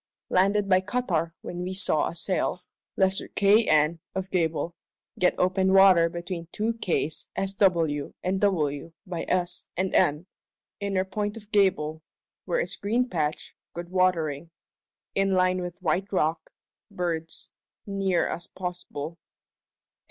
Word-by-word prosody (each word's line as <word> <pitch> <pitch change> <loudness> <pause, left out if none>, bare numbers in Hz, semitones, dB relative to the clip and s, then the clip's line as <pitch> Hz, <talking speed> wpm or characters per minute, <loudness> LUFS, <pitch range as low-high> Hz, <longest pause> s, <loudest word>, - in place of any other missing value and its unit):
Landed 200 +2 +3
by 185 -1 +4
cuttar 185 -6 -1
when 175 0 -6
wee 185 +1 -3
saw 155 -5 +1
a 170 - -9
sail. 180 0 -1 0.3
Lesser 190 -1 +2
Kay 205 +3 +4
N. 155 +2 +3 0.2
of 190 0 -3
Gable. 165 -1 0 0.4
Get 180 - +3
open 190 +1 +2
water 190 -4 +7
between 170 0 -5
two 220 +2 -1
kays 175 -8 -2
S.W. 180 -7 +1
and 190 +1 0
W. 160 -6 0
by 175 -3 -4
S., 180 -1 0
and 185 +1 0
N. 150 +4 +3 0.5
inner 195 -2 0
point 205 +2 -3
of 210 -1 -13
Gable 185 -7 +2 0.4
(where - - 0
is - - -4
green 235 +5 0
patch, 155 -3 -2 0.2
good 175 +1 -6
watering) 170 -5 +1 0.6
in 195 -1 +2
line 185 0 +2
with 180 -1 -6
white 185 +4 0
rock 160 -4 0 0.4
(birds), 165 -2 -3 0.3
neer 195 -3 +1
as 170 - -5
posble. 175 -4 -6
185 Hz, 135 wpm, -27 LUFS, 165-195 Hz, 0.6 s, water